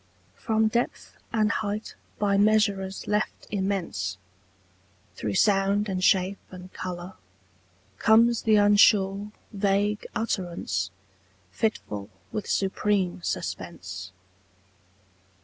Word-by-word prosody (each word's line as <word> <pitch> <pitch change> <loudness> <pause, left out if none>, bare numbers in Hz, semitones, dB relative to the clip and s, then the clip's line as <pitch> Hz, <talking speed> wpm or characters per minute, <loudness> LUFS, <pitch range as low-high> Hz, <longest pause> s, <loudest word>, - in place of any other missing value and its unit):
From 220 - +1
depth 235 +2 -2 0.2
and 215 -1 +2
height 210 0 -3 0.2
by 200 -1 +2
measurers 200 -2 +2
left 210 +1 -1
immense, 190 - -2 1.0
Through 100 0 -3
sound 200 - +3
and 185 -1 -2
shape 190 +1 +3
and 185 0 -11
colour, 180 0 -6 0.9
comes 230 +1 +5
the 220 -1 +4
unsure 205 -1 +4 0.2
Vague 205 +1 0
utterance, 180 - -2 0.6
fitful 105 - -2 0.2
with 210 - -4
supreme 195 -2 0
suspense. 95 - -5
200 Hz, 90 wpm, -26 LUFS, 185-210 Hz, 1.0 s, comes